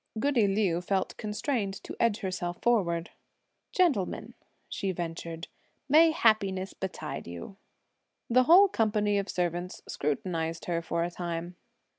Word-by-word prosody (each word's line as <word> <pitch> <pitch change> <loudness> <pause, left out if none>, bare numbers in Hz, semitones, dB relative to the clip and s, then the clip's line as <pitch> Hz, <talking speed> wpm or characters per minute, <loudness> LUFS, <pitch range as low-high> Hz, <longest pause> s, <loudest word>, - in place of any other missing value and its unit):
Goody 245 -4 +3
Liu 195 -4 +1
felt 190 +1 -1
constrained 210 -1 -2
to - - -7
edge 230 -1 +2
herself 175 -2 -3
forward. 175 -8 +1 0.6
"Gentlemen," 300 - +1 0.3
she 195 - -2
ventured, 165 -1 -5 0.4
"may 315 +4 +7
happiness 200 - +2
betide 180 - -5
you!" 85 - -8 0.7
The 255 +2 +4
whole 370 +7 +8
company 210 - +1
of 200 -1 -4
servants 175 0 -2
scrutinised 165 +2 -2
her 170 -1 -1
for 170 0 -1
a 175 - -2
time. 170 0 -4
190 Hz, 125 wpm, -29 LUFS, 170-220 Hz, 0.7 s, whole